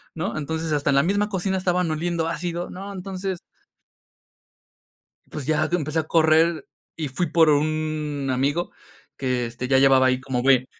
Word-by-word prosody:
¿no? 170 +2 -3
Entonces, 160 +2 -3
hasta 145 -1 0
en 140 - +3
la 140 - +4
misma 205 +5 +1
cocina 190 -1 -1
estaban 180 -2 0
oliendo 165 +1 -1
ácido, 170 +1 -3
¿no? 195 +2 -7
Entonces 190 -1 -4 1.9
pues 150 -4 -6
ya, 155 0 +1
que 175 - +1
empecé 155 -1 -2
a - - -1
correr 160 +1 +3 0.3
y 155 -3 -3
fui 140 +7 -1
por 165 -1 +5
un 150 -1 -1
amigo 140 +7 0 0.5
que, 125 -2 -1
este, 125 +2 -6
ya 130 0 +4
llevaba 135 -1 +5
ahí 130 0 +2
como 130 -2 -2
bue 130 -1 +4
155 Hz, 165 wpm, -23 LUFS, 140-175 Hz, 1.9 s, por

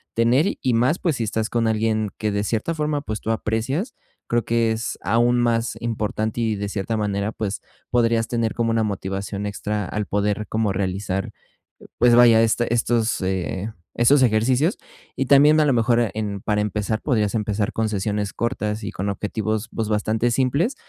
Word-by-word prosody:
tener. 120 +7 +3 0.2
Y 130 - +1
más, 125 +8 +2
pues, 165 -8 0
si 115 - -1
estás 110 +1 -2
con 115 -1 0
alguien 110 -1 0
que 105 -1 -1
de 100 0 -1
cierta 115 +9 -1
forma, 150 -2 -1
pues, 110 -6 -4
tú - - -5
aprecias, 115 - -2 0.3
creo 120 -1 0
que 115 -1 +1
es 110 0 -3
aún 120 +3 +2
más 115 0 0
importante 110 -1 -2
y 110 -2 0
de 100 0 -4
cierta 100 +2 -2
manera, 105 0 -1
pues, 105 -2 -4 0.3
podrías 115 -2 +2
tener 115 -2 0
como 115 -1 0
una 115 0 +1
motivación 100 0 -3
extra 105 0 -3
al 105 +3 -3
poder 105 +1 -1
como 110 -2 0
realizar, 95 0 -2 0.7
pues 120 0 +5
vaya, 115 -2 +7
este 115 +1 +1
estos, 115 -1 +1
eh, 95 +2 -2 0.2
estos 130 +5 +4
ejercicios. 125 - +2 0.4
Y 135 - -1
también 145 +3 +6
a - - +4
lo 145 - +3
mejor, 120 0 +3
eh, 115 -3 +1
en, 105 -2 -3
para 105 +1 0
empezar, 105 +1 -1
podrías 110 -7 0
empezar 105 -1 -1
con 110 0 0
sesiones 105 0 -2
cortas 110 -3 -2
y 100 - -3
con 100 +2 -4
objetivos, 110 +2 -2
pues, 110 -2 -2
bastante 110 +2 0
simples 140 - +1
110 Hz, 180 wpm, -22 LUFS, 105-120 Hz, 0.7 s, vaya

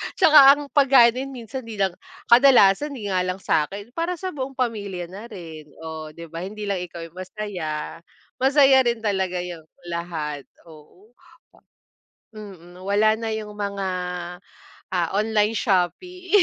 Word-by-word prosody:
'tsaka 310 -2 +7 0.2
ang 290 - -7
pagkain 265 -4 +6
din 265 +2 -4
minsan 235 +2 -7
'di 225 - -7
lang 195 -2 +1 0.4
kadalasan 255 +1 +6
di 205 -5 -5
nga 185 - +1
lang 180 0 -1
sa'kin, 200 +10 -1
para 335 +6 -2
sa 370 +2 -5
buong 270 -2 -6
pamilya 200 -8 -3
na 205 +4 -9
rin, 165 -8 -10 0.2
oh 160 -1 -6
'di 170 -1 -11
ba? 165 - -6
Hindi 205 +4 -7
lang 200 -2 -2
ikaw 175 -1 -7
yung 165 +2 -11
masaya, 180 -6 -5 0.4
masaya 270 0 +5
rin 235 -1 -1
talaga 190 -4 -1
yung 165 -3 -9 0.2
lahat, 160 -4 -5 0.2
oo 175 +8 -18 0.4
a - - -23 0.7
Mm, 190 -5 -12
nawala 205 +3 +3
na 225 +1 -4
yung 215 -1 -5
mga, 200 -2 -3 1.1
ah, 175 -2 0
online 215 0 +1
shopping. 360 - -1
200 Hz, 150 wpm, -23 LUFS, 175-235 Hz, 1.1 s, tsaka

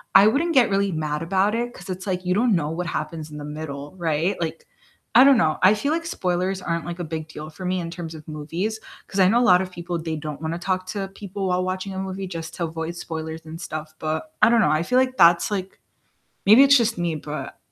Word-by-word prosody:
I 195 +2 +9
wouldn't 320 +8 +2
get 255 -5 +5
really 195 0 +1
mad 150 0 -2
about 195 +5 +1
it 240 +1 -2
'cause 180 +2 -12
it's 185 +2 -5
like 185 -1 -2
you 180 - +2
don't 225 0 +3
know 150 -3 0
what 175 +1 -3
happens 155 -1 -4
in 150 - -8
the 145 - -7
middle, 150 -1 -6
right, 165 +2 0
like, 165 0 -4 0.5
I 250 - +10
don't 275 -3 +7
know, 155 -8 +2
I 190 +3 +7
feel 280 +8 -1
like 330 +1 -1
spoilers 185 - -1
aren't, 170 -2 -2
like, 175 0 -6
a - - -2
big 160 0 -5
deal 155 -1 -8
for 185 +4 -9
me 185 0 0
in 165 0 -5
terms 165 -2 -7
of 150 - -11
movies, 170 +9 -3 0.3
'cause 195 - -4
I 185 - +6
know 235 +5 +4
a - - +3
lot 180 +1 +6
of 185 -1 -5
people, 175 0 -4
they 160 -1 -3
don't 150 -1 -6
wanna 160 +1 -2
talk 185 0 -1
to 195 0 -3
people 195 0 -5
while 180 0 +1
watching 185 +1 -3
a 190 - -4
movie 190 0 -4
just 165 -2 -6
to 170 - -3
avoid 165 +1 -5
spoilers 160 -1 -6
and 160 +1 -8
stuff, 155 -2 -6
but 160 - -3
I - - +7
don't 235 -1 +4
know. 170 - +3
I 155 +2 +2
feel 250 +7 +2
like 255 0 0
that's 170 +2 +6
like, 190 -2 -4 0.7
maybe 220 +7 +8
it's 280 0 +7
just 230 -4 +1
me, 170 -2 -1
but 150 -2 -6
180 Hz, 255 wpm, -23 LUFS, 160-195 Hz, 0.7 s, I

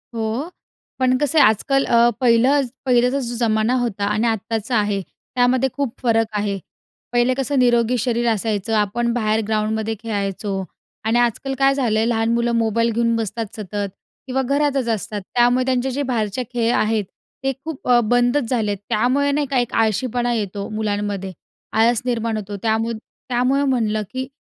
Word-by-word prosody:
हो. 225 +8 -2 0.5
पण 255 0 +3
कसं 295 +3 +2
आहे - - +8
आजकाल 270 +6 +1
अ, 235 0 +4
पहिलंच 255 +3 +3 0.2
पहिल्याचा 250 +1 +3
जो 240 -2 -4
जमाना 220 0 +1
होता 210 -5 -1
आणि 215 +3 +1
आत्ताचा 225 +1 -2
आहे 205 -2 0
त्यामध्ये 250 +6 0
खूप 280 -5 -2
फरक 225 -2 +2
आहे. 205 -1 -1 0.6
पहिले 240 +1 +3
कसं 270 +1 -1
निरोगी 240 -1 +3
शरीर 240 0 0
असायचं. 220 -1 -1
आपण 235 +3 0
बाहेर 220 -2 +1
ग्राऊंडमध्ये 220 0 -1
खेळायचो 200 -3 -3 0.4
आणि 225 +2 +2
आजकाल 240 +3 0
काय 275 0 +4
झालंय, 225 -5 +1
लहान 225 -1 +1
मुलं 235 0 +1
मोबाईल 230 0 +1
घेऊन 230 +1 +1
बसतात 225 0 -2
सतत 205 -1 -4 0.4
किंवा 265 +1 0
घरातच 280 -1 0
असतात. 210 -1 -2
त्यामुळे 245 +1 +4
त्यांचे 260 0 0
जे 285 +3 -2
बाहेरचे 220 +1 -1
खेळ 235 0 +1
आहेत, 215 -1 +1 0.4
ते 270 - +1
खूप 320 -4 -7
अ, 245 -1 +6
बंदच 245 +3 +2
झालेत. 215 -5 0
त्यामुळे 255 +6 +2
नाही 290 +1 +1
का, 270 - +2
एक 245 - -2
आळशीपणा 240 +2 +1
येतो 200 -3 -3
मुलांमध्ये. 205 -3 -2 0.4
आळस 225 +1 +3
निर्माण 230 -2 -1
होतो. 205 -1 -5
त्यामुद 225 +1 0 0.3
त्यामुळे 255 +3 +2
म्हणलं, 225 -6 +1
की 260 0 -4
235 Hz, 160 wpm, -21 LUFS, 215-250 Hz, 0.6 s, आहे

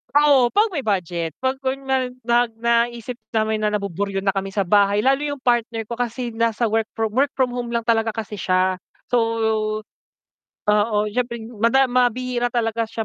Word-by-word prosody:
Oo 280 -5 +5
pag 425 +2 +4
may 280 - -2
budget, 175 -6 -1
'pag 260 0 0
kunyari 265 -1 -1 0.2
nag 240 0 +3
naisip 235 +1 0 0.2
namin 220 -1 0
na 210 - +2
nabuburyo 200 -1 -2
na 195 0 0
kami 195 0 -2
sa 195 -2 -1
bahay 200 +1 +4
lalo 270 +5 +2
yung 285 -1 -3
partner 235 -3 0
ko 235 - -4
kasi 240 0 -3
nasa 230 0 +1
work 220 0 0
from, 220 -1 -3
work 275 +2 +2
from 260 -2 +1
home 240 -1 -4
lang 235 -1 -2
talaga 225 -1 +2
kasi 215 -1 -6
siya 185 -1 +1 0.3
so, - - 0 1.5
oo, 210 +1 +3
syempre 240 0 -1 0.2
mada 235 +4 +4
ma 250 -1 +3
bihira 245 0 -2
talaga 230 -1 -1
siya 225 0 -4
230 Hz, 175 wpm, -22 LUFS, 210-250 Hz, 1.5 s, Oo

